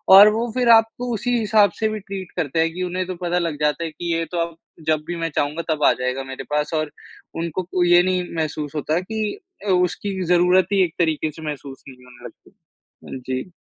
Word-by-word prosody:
और 200 +2 +11
वो 230 +1 -2
फ़िर 250 -2 +2
आपको 230 +2 +4
उसी 240 +3 0
हिसाब 215 -2 +4
से 220 - +1
भी 215 0 -4
ट्रीट 195 -2 -7
करते 160 -2 -1
हैं 165 0 +2
कि 185 +2 -3
उन्हें 180 +1 -2
तो 185 - -4
पता 175 0 +1
लग 165 -4 -2
जाता 150 +2 +1
है 160 - -5
कि 170 +2 -3
ये 165 0 -1
तो 175 - -3
अब 170 -1 -11 0.3
जब 155 -1 +2
भी 175 - -3
मैं 165 0 -2
चाहूँगा 150 +3 -1
तब 150 -1 -4
आ - - +7
जाएगा 130 +1 -1
मेरे 135 0 -7
पास 150 +2 0
और 155 -1 -1 0.5
उनको 170 +2 -3 0.2
ये 175 0 +6
नहीं 185 0 +1
महसूस 155 -2 -3
होता 150 +1 -1
है 175 - +1
कि 215 +1 -3 0.3
अ, - - 0
उसकी 185 +2 0
ज़रूरत 180 +1 +4
ही 195 -1 +5
एक 165 - -7
तरीक़े 160 -2 +1
से 160 +2 -12
महसूस 140 -2 -7
नहीं 125 -1 -15
होने 125 -1 -15
लगती। - - -13 0.6
हुँ, 130 - -7
जी। 130 +6 -4
175 Hz, 230 wpm, -22 LUFS, 150-190 Hz, 0.6 s, और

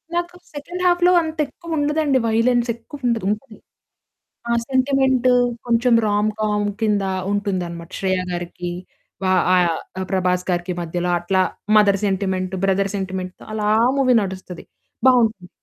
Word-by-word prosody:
నాకు 345 +1 -2 0.2
సెకండ్ 345 +5 -6
హాఫ్‌లో 355 0 +4
అంతెక్కువుండదండి 305 -2 -1
వయలెన్స్ 235 +2 +2
ఎక్కువుండదు. 235 -3 -3
ఉంది. 215 +1 -6 0.9
ఆ 235 - +2
సెంటిమెంట్ 265 -1 +2 0.4
కొంచెం 235 +1 +2
రామ్ 205 +1 +1
కామ్ 210 -1 0
కింద 210 -2 +1 0.3
ఉంటుందన్నమాట. 180 -5 -3
'శ్రేయ' 185 -1 0
గారికి 175 0 -5 0.5
వా 185 - +2 0.2
ఆహ్, 180 -1 +3 0.3
ఆ - - -2
'ప్రభాస్' 180 -1 0
గారికి 175 0 -1
మధ్యలో 175 +1 -2
అట్లా 185 +2 +1 0.4
మదర్ 200 -2 +4
సెంటిమెంట్, 190 -1 -1
బ్రదర్ 195 0 +1
సెంటిమెంట్‌తో 185 -1 -5
అలా 210 -1 -1 0.2
ఆ - - +4
మూవీ 255 -2 +4
నడుస్తది 185 -2 -7 0.4
బావుంటుంది. 225 -7 +3
210 Hz, 125 wpm, -21 LUFS, 185-255 Hz, 0.9 s, హాఫ్‌లో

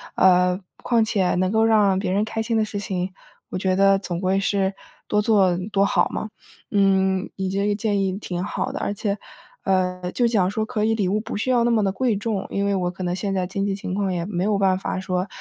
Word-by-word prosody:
呃， 180 0 +4 0.2
况 235 -2 +3
且 195 -5 +1
能 185 +1 +1
够 220 +1 +3
让 210 -4 +4
别 190 - -2
人 205 +3 +1
开 220 0 -3
心 225 0 0
的 220 - +2
事 205 -1 -5
情， 190 -2 -3 0.4
我 - - -3
觉 185 0 +1
得 195 0 +5
总 175 -3 -4
归 190 +1 +1
是 195 0 0 0.3
多 210 - +2
做 200 -5 +3
多 200 0 +3
好 - - +2
嘛。 220 - -4 0.4
嗯， 190 -2 +2
你 190 -1 -2
这 200 +1 0
个 205 - +2
建 205 -1 0
议 190 -1 -1
挺 180 -3 -4
好 205 - -3
的。 - - -4
而 - - -2
且， 205 0 -2 0.5
呃， 180 -1 0
就 240 - +2
讲 200 -6 +2
说 215 +1 -1
可 220 -2 -2
以 225 - +2
礼 205 -4 0
物 205 +3 0
不 220 - -5
需 220 - -2
要 245 -2 +3
那 240 - +2
么 225 -2 +3
的 195 - +1
贵 245 0 +1
重， 205 -2 -2
因 200 0 -1
为 200 0 +1
我 180 -2 -1
可 185 +1 -7
能 175 0 -1
现 195 +1 -2
在 185 -1 0
经 195 +2 -2
济 200 - 0
情 195 -2 -5
况 195 -2 0
也 170 -1 -2
没 180 -2 -2
有 205 0 +1
办 190 -2 +2
法 190 - -3
说 185 0 -2
195 Hz, 265 characters per minute, -23 LUFS, 185-210 Hz, 0.5 s, 得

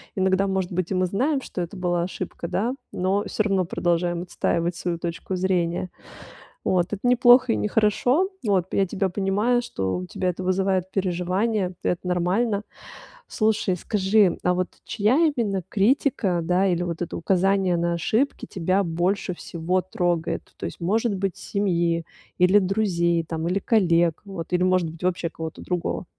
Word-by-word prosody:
Иногда, 190 +1 +2
может 190 -1 -1
быть 180 -1 -2
и - - +2
мы 185 - +2
знаем, 265 - 0
что 185 - -5
это 175 +2 -5
была 175 -2 0
ошибка, 180 -1 -5
да, 230 +9 -1 0.2
но 195 +3 0
всё 215 - 0
равно 195 -3 +1
продолжаем 175 0 0
отстаивать 170 -1 -1
свою 175 -1 -2
точку 170 +2 -4
зрения. 180 -1 0 0.8
Вот. 180 -2 +2
Это 200 - -3
не 250 0 +5
плохо 245 0 +6
и - - +1
не - - -1
хорошо. 245 - +2 0.2
Вот. 190 -3 +1
Я 195 - +2
тебя 190 +1 -1
понимаю, 205 +6 +1
что 95 - -2
у 90 - -5
тебя 185 - -2
это 180 +1 -6
вызывает 185 0 0
переживания, 185 +2 -1
это 180 +1 -1
нормально. 195 +5 +1 0.7
Слушай, 215 -5 +1
скажи, 195 0 +2
а 180 - +2
вот 185 0 -1 0.2
чья 215 +5 +1 0.2
именно 200 -7 -1
критика, 205 -4 +1
да, 180 +3 +2
или 175 -2 +1
вот 170 -1 -4
это 175 - -4
указание 190 0 +2
на 170 0 0
ошибки 225 - 0
тебя 185 +2 0
больше 180 +3 -1
всего 175 +2 -2
трогает? 175 -2 -1 0.2
То - - -4
есть, - - -8
может 210 +5 +1
быть, 195 -2 -2
семьи 170 -4 0 0.3
или 180 +3 +6
друзей 180 -4 +1
там, 160 +1 -3
или 185 - +1
коллег 170 -6 +2
вот, 185 -4 -7
или, 180 0 +2
может 185 -3 +2
быть, 165 +1 -13
вообще 180 -2 0
кого-то 160 -1 -7
другого. 180 0 -2
185 Hz, 165 wpm, -24 LUFS, 175-200 Hz, 0.8 s, плохо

